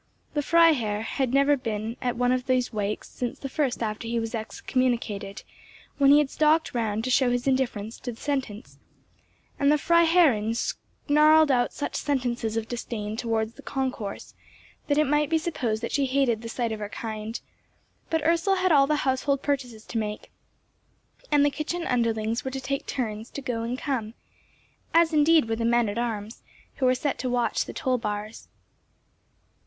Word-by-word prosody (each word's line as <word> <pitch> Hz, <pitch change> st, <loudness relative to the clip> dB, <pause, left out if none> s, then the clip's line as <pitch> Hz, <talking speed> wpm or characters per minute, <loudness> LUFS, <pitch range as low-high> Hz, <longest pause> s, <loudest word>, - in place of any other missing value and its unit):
The 295 Hz, -, +1 dB
Freiherr 275 Hz, -11 st, +3 dB
had 260 Hz, +2 st, -1 dB
never 280 Hz, +2 st, +4 dB
been 225 Hz, -3 st, -4 dB
at 245 Hz, -2 st, -1 dB
one 245 Hz, +1 st, +1 dB
of 255 Hz, 0 st, -1 dB
these 255 Hz, -2 st, +1 dB
wakes 210 Hz, 0 st, -2 dB
since 245 Hz, -1 st, -5 dB
the 275 Hz, -, -6 dB
first 265 Hz, -3 st, -1 dB
after 215 Hz, +1 st, -4 dB
he 235 Hz, 0 st, 0 dB
was 225 Hz, 0 st, -4 dB
excommunicated, 220 Hz, -3 st, -2 dB, 0.6 s
when 275 Hz, -1 st, +5 dB
he 285 Hz, -, +8 dB
had 295 Hz, -2 st, +2 dB
stalked 310 Hz, +1 st, +2 dB
round 220 Hz, -2 st, -1 dB
to 255 Hz, -, -1 dB
show 255 Hz, 0 st, +4 dB
his 245 Hz, 0 st, -1 dB
indifference 240 Hz, -5 st, -1 dB
to 245 Hz, -, -5 dB
the 225 Hz, -, -13 dB
sentence; 265 Hz, -6 st, -4 dB, 0.8 s
and 280 Hz, 0 st, +4 dB
the 300 Hz, -, +4 dB
Freiherrinn 325 Hz, -10 st, +3 dB
snarled 305 Hz, +4 st, +3 dB
out 245 Hz, -2 st, +2 dB
such 285 Hz, -, -4 dB
sentences 245 Hz, -5 st, -1 dB
of 225 Hz, -1 st, -2 dB
disdain 220 Hz, -3 st, -4 dB
towards 225 Hz, -1 st, -1 dB
the 280 Hz, -, -13 dB
concourse, 260 Hz, -7 st, -4 dB, 0.5 s
that 285 Hz, -, +1 dB
it 305 Hz, -, +5 dB
might 295 Hz, +1 st, +1 dB
be 325 Hz, -, +3 dB
supposed 245 Hz, -9 st, -2 dB
that -, -, -3 dB
she 280 Hz, -2 st, +1 dB
hated 255 Hz, -4 st, +1 dB
the 230 Hz, -, -7 dB
sight 235 Hz, -1 st, -2 dB
of 220 Hz, -, -4 dB
her 205 Hz, -1 st, -5 dB
kind; 220 Hz, +1 st, -5 dB, 0.7 s
but 320 Hz, -2 st, 0 dB
Ursel 335 Hz, +4 st, +3 dB
had 370 Hz, -1 st, +1 dB
all 275 Hz, -3 st, +5 dB
the 300 Hz, -1 st, 0 dB
household 270 Hz, +1 st, 0 dB
purchases 250 Hz, -6 st, -2 dB
to 230 Hz, -, -3 dB
make, 210 Hz, -1 st, -5 dB, 1.0 s
and 290 Hz, -1 st, +5 dB
the 290 Hz, -, +2 dB
kitchen 335 Hz, +4 st, -3 dB
underlings 230 Hz, -1 st, 0 dB
were 265 Hz, -, -3 dB
to 265 Hz, 0 st, -5 dB
take 275 Hz, +1 st, -3 dB
turns 220 Hz, -3 st, -3 dB
to -, -, -7 dB
go 245 Hz, -3 st, -2 dB
and 235 Hz, +2 st, -3 dB
come, 240 Hz, -6 st, -3 dB, 0.8 s
as 335 Hz, -1 st, +5 dB
indeed 305 Hz, -2 st, +4 dB
were 225 Hz, -, 0 dB
the 230 Hz, -, -2 dB
men 235 Hz, 0 st, +3 dB
at 205 Hz, +3 st, -3 dB
arms, 220 Hz, -2 st, -4 dB, 0.4 s
who 260 Hz, -, +2 dB
were 255 Hz, -, +4 dB
set 275 Hz, +2 st, -2 dB
to 255 Hz, -, -2 dB
watch 245 Hz, -1 st, 0 dB
the -, -, -8 dB
toll 255 Hz, -3 st, 0 dB
bars. 210 Hz, 0 st, -5 dB
250 Hz, 180 wpm, -26 LUFS, 225-285 Hz, 1.0 s, he